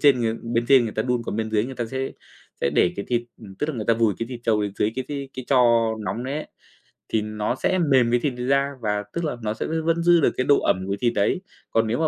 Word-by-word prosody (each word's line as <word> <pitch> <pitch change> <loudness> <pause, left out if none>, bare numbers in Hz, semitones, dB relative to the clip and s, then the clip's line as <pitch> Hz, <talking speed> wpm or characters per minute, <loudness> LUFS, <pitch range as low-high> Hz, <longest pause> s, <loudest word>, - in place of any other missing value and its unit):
trên 140 -4 +5
người 115 -1 0
ta - - -8
bên 115 0 0
trên 135 -2 +7
người 110 - -3
ta 110 - -1
đun 125 -1 0
còn - - -3
bên 110 0 -2
dưới 105 0 +2
người 130 - -7
ta 120 -1 -2
sẽ 135 +2 -3 0.5
sẽ 70 - +1
để 90 - +4
cái 100 - -3
thịt, 120 -1 +1 0.2
ừm, 100 -3 -10
tức 150 - -3
là 155 - -2
người 110 - -3
ta 115 - +3
vùi 115 -3 +2
cái 115 - -2
thịt 125 -2 -7
trâu 110 -3 +2
dưới 105 - +1
cái 130 - -2 0.3
cái 130 - -6
tro 135 - +2 0.5
nóng 120 +3 -3
đấy 135 +2 -3
ấy, 155 - -4 0.6
thì 110 - +1
nó 105 +2 -2
sẽ 185 +7 0
mềm 130 -7 +3
cái 120 - +3
thịt 135 +2 -1
đấy 125 - -3
ra 140 +1 +2
và 105 -2 -1
tức 170 - -2
là 145 -5 -2
nó 105 -1 -1
sẽ 110 - -4
v - - -5
vẫn 165 0 +1
giữ 175 -1 +5
được - - +3
cái 130 - +1
độ 145 - +5
ẩm 95 +1 0
của 100 - -1
thịt 120 -1 +2
đấy. 100 - +1 0.3
Còn 115 -1 +2
nếu 115 +3 -1
mà 160 - +2
120 Hz, 300 wpm, -24 LUFS, 110-135 Hz, 0.6 s, trên